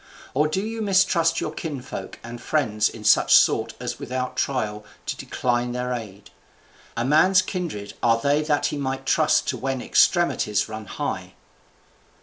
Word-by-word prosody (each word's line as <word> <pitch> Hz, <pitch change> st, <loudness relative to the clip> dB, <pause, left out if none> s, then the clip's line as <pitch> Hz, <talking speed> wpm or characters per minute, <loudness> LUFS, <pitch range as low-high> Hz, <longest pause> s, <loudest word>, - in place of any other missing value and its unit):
or 150 Hz, +4 st, +2 dB
do 170 Hz, +5 st, -1 dB
you 225 Hz, 0 st, -4 dB
mistrust 185 Hz, -5 st, +3 dB
your -, -, -3 dB
kinsfolk 140 Hz, -5 st, -6 dB
and 120 Hz, 0 st, -8 dB
friends 110 Hz, -9 st, +1 dB
in 110 Hz, -, -11 dB
such 105 Hz, -, +5 dB
sort -, -, +3 dB
as -, -, -5 dB
without 130 Hz, 0 st, -4 dB
trial 110 Hz, -6 st, -2 dB, 0.2 s
to -, -, -3 dB
decline 120 Hz, -1 st, -1 dB
their 125 Hz, 0 st, -2 dB
aid? 105 Hz, -4 st, -8 dB, 0.7 s
A 115 Hz, -, 0 dB
man's 185 Hz, +7 st, +5 dB
kindred 170 Hz, -, -5 dB
are 115 Hz, -1 st, +3 dB
they 145 Hz, +4 st, +2 dB
that 150 Hz, -1 st, 0 dB
he 145 Hz, -, -1 dB
might 135 Hz, -1 st, -3 dB
trust -, -, +2 dB
to -, -, -1 dB
when 135 Hz, -1 st, -2 dB
extremities 125 Hz, -, +2 dB
run 110 Hz, -1 st, -7 dB
high." -, -, -4 dB
130 Hz, 155 wpm, -24 LUFS, 115-155 Hz, 0.7 s, such